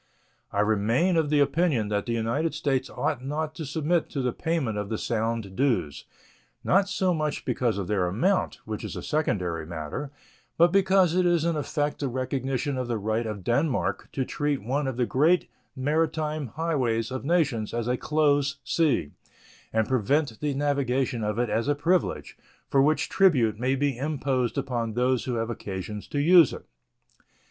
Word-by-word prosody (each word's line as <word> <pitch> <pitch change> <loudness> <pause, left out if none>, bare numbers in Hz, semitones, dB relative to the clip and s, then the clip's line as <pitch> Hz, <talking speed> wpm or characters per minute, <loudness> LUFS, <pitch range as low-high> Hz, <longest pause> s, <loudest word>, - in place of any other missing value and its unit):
I 100 - +1
remain 110 - +2
of 160 -3 +2
the 150 -1 +3
opinion 140 -8 +1
that 105 -1 -1
the 120 - 0
United 115 +8 -1
States 135 -2 0
ought 125 - -2
not 155 +3 -3
to 160 -2 -6
submit 160 +3 0
to 135 - -3
the 125 -2 0
payment 160 -10 -1
of 105 -1 -4
the 110 - -2
Sound 115 -3 -2
dues, 115 - 0 0.6
not 195 +2 +3
so 185 -2 +1
much 155 -2 -2
because 120 -5 0
of 100 - -2
their 95 -2 0
amount, 180 - +1
which 110 -1 -5
is - - -5
a - - -6
secondary 90 - -1
matter, 80 - -5 0.5
but 170 +1 +5
because 190 -2 +4
it 180 0 +3
is 170 -2 +2
in 170 -1 +1
effect 150 0 -2
the 140 - -1
recognition 130 +2 -2
of 125 - -3
the 120 -2 -1
right 110 +2 -1
of 105 -3 -5
Denmark 135 - 0
to 130 - -1
treat 145 -4 -2
one 135 +5 -1
of 130 -2 -3
the 125 - +2
great 160 +9 +2 0.3
maritime 155 +1 -1
highways 130 -6 -1
of 130 - -4
nations 140 -9 +1
as 120 0 -2
a 125 - +1
close 145 -1 +1
sea, 120 - +1 0.6
and 110 -1 +1
prevent 130 0 +1
the 145 -2 -1
navigation 135 -4 0
of 105 +1 -1
it 120 -1 0
as 115 +4 0
a 145 - +2
privilege, 170 +5 0 0.3
for 135 - +5
which 150 +3 +2
tribute 125 - +3
may 130 +2 +1
be 140 -1 0
imposed 135 -3 -1
upon 120 -5 -2
those 125 +1 +1
who 125 - -2
have 115 0 -2
occasion 105 -1 -5
to - - -4
use 165 0 +6
it. - - -9
135 Hz, 180 wpm, -26 LUFS, 115-155 Hz, 0.6 s, use